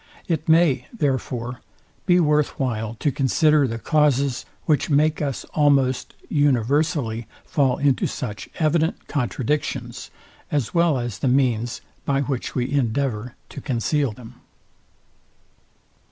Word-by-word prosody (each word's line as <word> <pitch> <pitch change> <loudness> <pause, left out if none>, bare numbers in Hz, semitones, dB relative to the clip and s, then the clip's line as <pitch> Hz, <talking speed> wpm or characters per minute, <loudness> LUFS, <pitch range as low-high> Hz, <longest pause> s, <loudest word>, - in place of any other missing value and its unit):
It 160 -2 -1
may, 160 -6 +4
therefore, 130 - -2 0.5
be 180 -1 +5
worth 150 -2 +2
while 115 -4 -2
to 145 +5 0
consider 145 +2 +3
the 115 -1 -3
causes, 140 -1 +1 0.2
which 155 -1 +1
make 155 +2 +2
us 140 -3 -2
almost 140 -4 +2
universally 140 -3 +1 0.2
fall 140 -7 +1
into 140 -2 +2
such 105 -4 -6
evident 160 +1 0
contradictions, 130 -2 -2 0.4
as 145 -6 -1
well 170 -4 +3
as 120 -5 -4
the - - 0
means 125 -3 +1 0.2
by 140 -1 +1
which 135 -3 -3
we 125 0 -1
endeavour 125 -3 -1
to - - -8
conceal 135 +1 0
them. 120 +2 -13
135 Hz, 120 wpm, -23 LUFS, 120-150 Hz, 0.5 s, be